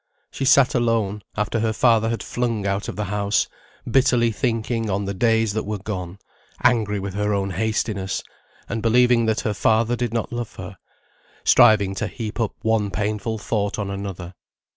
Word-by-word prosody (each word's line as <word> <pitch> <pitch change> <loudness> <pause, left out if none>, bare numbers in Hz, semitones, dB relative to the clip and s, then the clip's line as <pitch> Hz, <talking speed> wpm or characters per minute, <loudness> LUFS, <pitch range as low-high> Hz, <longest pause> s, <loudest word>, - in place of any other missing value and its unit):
She 135 - -3
sat 130 0 +5
alone, 115 -4 0 0.2
after 105 +2 0
her 110 0 0
father 115 -1 +3
had 115 - -3
flung 115 -4 -2
out 100 +1 -1
of - - -5
the 105 - -2
house, 100 +1 0 0.4
bitterly 120 -2 +3
thinking 115 -1 -1
on 100 +1 -1
the 100 - -3
days 115 +1 +2
that 110 - -1
were 105 +1 -3
gone; 95 -2 -5 0.5
angry 105 -4 +2
with 95 0 -5
her 105 +1 0
own 100 -1 -1
hastiness, 105 -1 -2 0.4
and 115 - -3
believing 120 0 +4
that 110 +1 +1
her 105 - -1
father 110 +3 +2
did 120 -2 -2
not 115 0 -3
love 120 -2 -5
her; - - -8 0.7
striving 105 -5 +5
to - - -2
heap 115 -2 -6
up 115 -3 -1
one 110 -2 +1
painful 105 +2 -2
thought 105 -1 -2
on 100 -2 -3
another. 95 -3 -6
110 Hz, 175 wpm, -22 LUFS, 100-115 Hz, 0.7 s, sat